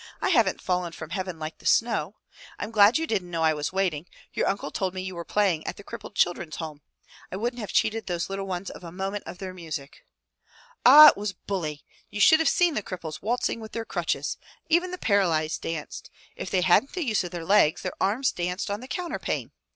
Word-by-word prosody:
"I - - 0
haven't 230 - +2
fallen 180 -2 -1
from 160 0 -9
heaven 185 -1 -3
like 155 0 -6
the - - -18
snow. 225 -3 +2 0.4
I'm 210 - -5
glad 215 +3 +6
you 325 - -1
didn't 195 - -2
know 165 -2 -1
I 160 -1 +4
was 150 -1 -3
waiting. 180 -4 -1 0.3
Your - - 0
uncle 200 - -2
told 190 -1 -2
me 185 - -3
you 185 0 -5
were 170 -1 -6
playing 190 -5 +1
at - - -4
the 200 - -11
Crippled 210 -1 -9
Children's 175 -3 0
Home. 155 -3 -7 0.5
I - - -4
wouldn't 240 +5 -2
have 210 - -5
cheated 225 +1 +1
those 175 -2 -2
little 195 0 -4
ones 185 0 -4
of - - -12
a 170 - -8
moment 195 +3 -4
of 180 - -8
your 185 -1 -5
music." 160 -6 -7 0.8
"Ah! 295 +5 +11
it - - -1
was 205 -1 -3
bully! 165 -6 -5 0.2
You 210 - -6
should 315 +9 +7
have 320 - +3
seen 350 -2 +3
the 250 - -1
cripples 170 -5 -7
waltzing 230 +2 -1
with 220 -1 -10
their 230 -1 -3
crutches! - - -2 0.3
Even 345 +3 +3
the 365 - -5
paralyzed 170 - +1
danced. 165 -2 -5 0.3
If - - -6
they 185 - +1
hadn't 185 +9 +3
the 360 -4 -2
use 215 -6 +1
of 175 - -5
their 170 -1 -6
legs, 195 -5 +4
their 185 - -3
arms 225 +7 +2
danced 180 +3 -3
on 205 - -2
the 255 - -10
counterpane! 345 +4 -3
190 Hz, 220 wpm, -26 LUFS, 170-220 Hz, 0.8 s, Ah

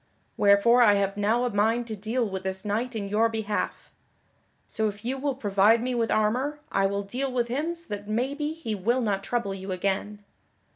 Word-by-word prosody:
Wherefore 205 +5 +5
I 210 -4 +6
have 200 0 0
now 215 +4 +1
a 245 - 0
mind 225 +4 +1
to 220 -2 -5
deal 225 +4 -1
with 190 -1 -4
this 190 +1 -4
knight 230 +4 -2
in 205 -2 -3
your 215 +3 +2
behalf. 220 -2 -3 0.8
So 220 -1 -1
if 205 +1 -7
you 255 +2 -1
will 280 -1 -1
provide 210 -1 +3
me 255 0 -1
with 230 -2 0
armor 250 +8 +1
I 195 0 +2
will 200 +1 -2
deal 255 +7 -3
with 240 -2 -1
him 305 +7 -1
so 335 0 -8
that 205 0 -6
maybe 280 +7 -1
he 320 -9 -5
will 230 +6 0
not 200 -4 -1
trouble 235 -3 -2
you 190 0 -6
again. 200 +3 -2
220 Hz, 200 wpm, -26 LUFS, 200-245 Hz, 0.8 s, I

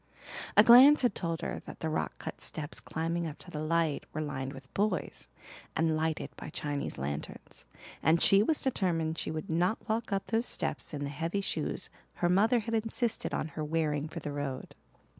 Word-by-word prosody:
A 210 - +10
glance 260 +6 +9
had 245 - +3
told 165 -3 -3
her - - -4
that - - -9
the 160 - -1
rock 155 - -2
cut - - -7
steps 150 -2 -5
climbing 165 +1 -2
up 150 - -7
to 175 - -12
the 150 - -4
light 160 -1 0
were 155 - -3
lined 135 -3 -3
with 135 -1 -12
boys, 210 +2 -1 0.5
and 160 0 +2
lighted 160 0 -1
by - - -8
Chinese 145 -1 -3
lanterns, 70 +2 -5 0.4
and 160 +3 +4
she 195 +3 +6
was 300 +8 +1
determined 165 -10 0
she - - -3
would 155 -1 -4
not 175 +6 +1
walk 225 0 -1
up 195 -1 0
those 230 +1 0
steps - - -2
in 145 - -3
the 140 - -3
heavy 165 +7 -2
shoes - - -2 0.2
her 175 - +1
mother 220 +6 +4
had 230 +2 -5
insisted 225 +1 0
on 155 - -2
her 155 +1 -5
wearing 150 -1 0
for 170 - -6
the 150 - -5
road. 140 -2 -4
165 Hz, 195 wpm, -31 LUFS, 150-205 Hz, 0.5 s, A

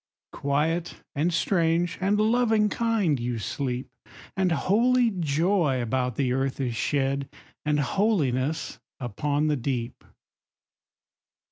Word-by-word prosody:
Quiet, 155 +5 -1 0.2
and 155 +5 +1
strange, 170 0 +1
and 200 +2 +2
loving 220 -1 +3
kind, 210 - +1
you 120 0 -2
sleep. 125 +3 -3 0.5
And 190 -2 +1
holy 235 +7 +3
joy 165 -3 +1
about 125 0 -1
the 130 -3 0
earth 135 +1 -1
is 125 -4 -1
shed; 135 +2 0 0.4
And 150 0 +2
holiness 150 - 0 0.2
upon 145 +5 -1
the 150 -1 +1
deep. 120 -2 -3
150 Hz, 110 wpm, -26 LUFS, 130-190 Hz, 0.5 s, loving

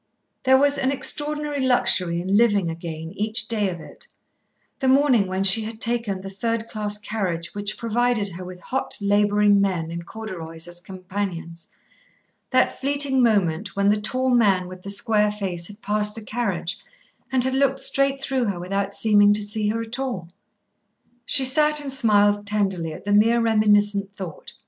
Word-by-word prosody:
There 265 0 +6
was 285 +1 +3
an 265 -1 +1
extraordinary 295 +1 -1
luxury 185 -9 +2
in 190 +3 -1
living 205 -6 +3
again 160 -1 -7
each 220 +2 -1
day 210 -4 0
of 175 -2 -6
it, - - -11 0.7
the 265 - -1
morning 260 -6 +4
when 190 +1 -2
she 195 +3 +4
had 220 0 -7
taken 230 -5 -1
the 195 - -7
third 230 +3 -2
class 210 -2 -2
carriage 190 -6 -4
which 205 +1 -3
provided 230 -2 +1
her 185 0 -8
with 180 0 -10
hot, 265 +8 -3
labouring 205 0 +3
men 175 -5 -1
in 170 0 -5
corduroys 170 -5 -7
as 175 0 -8
companions, 185 -2 -6 0.8
that - - +1
fleeting 280 -1 +3
moment 200 -5 +1
when 200 0 +2
the 210 0 +1
tall 255 +4 0
man 200 -7 +3
with 185 0 -10
the 200 - -8
square 210 +1 +1
face 190 -5 -4
had 205 +1 -14
passed 210 0 0
the 225 - -9
carriage 205 -5 -3 0.5
and 255 -1 +2
looked 270 0 +2
straight 275 0 +2
through 270 -2 -1
her 195 -5 -3
without 195 +2 -3
seeming 205 -2 +4
to 210 0 0
see 210 0 -2
her 225 +2 -2
at 230 +3 -4
all. 235 -11 -4 1.0
She 270 -2 +4
sat 300 +3 +3
and 280 -2 -3
smiled 205 -5 +3
tenderly 195 -6 0
at 155 - -10
the 205 - 0
mere 225 +3 +4
reminiscent 205 -3 +2
thought. 180 -5 -8
210 Hz, 170 wpm, -23 LUFS, 190-240 Hz, 1.0 s, There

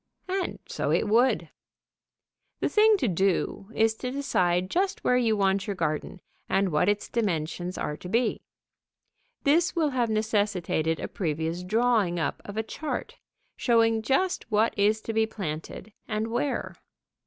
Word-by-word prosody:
And 375 0 -2
so - - -2
it - - +2
would. 240 +5 +3 1.1
The - - 0
thing 430 0 +5
to 265 - 0
do 195 +1 0
is 225 0 +3
to 250 - -4
decide 185 -10 0
just 385 +2 0
where 250 - +3
you 230 -3 +2
want 195 +1 +1
your 200 - -2
garden, 155 +3 -3 0.3
and 195 0 +2
what 160 +5 +3
its 205 0 0
dimensions 180 -4 -2
are 150 - -2
to 180 - -9
be. 230 +3 +1 1.0
This 330 +6 +3
will 315 -4 +2
have 245 -3 0
necessitated 205 -7 0
a - - -3
previous 165 0 -2
drawing 215 -2 +2
up 160 - -2
of 205 +1 -7
a 220 - +1
chart, 305 +7 -5 0.4
showing 225 -2 +3
just 310 +11 0
what 215 +1 +2
is 210 +2 +2
to 225 - -4
be 220 0 +2
planted 190 0 -6
and 215 +1 -2
where. 255 +5 -2
215 Hz, 155 wpm, -27 LUFS, 185-240 Hz, 1.1 s, thing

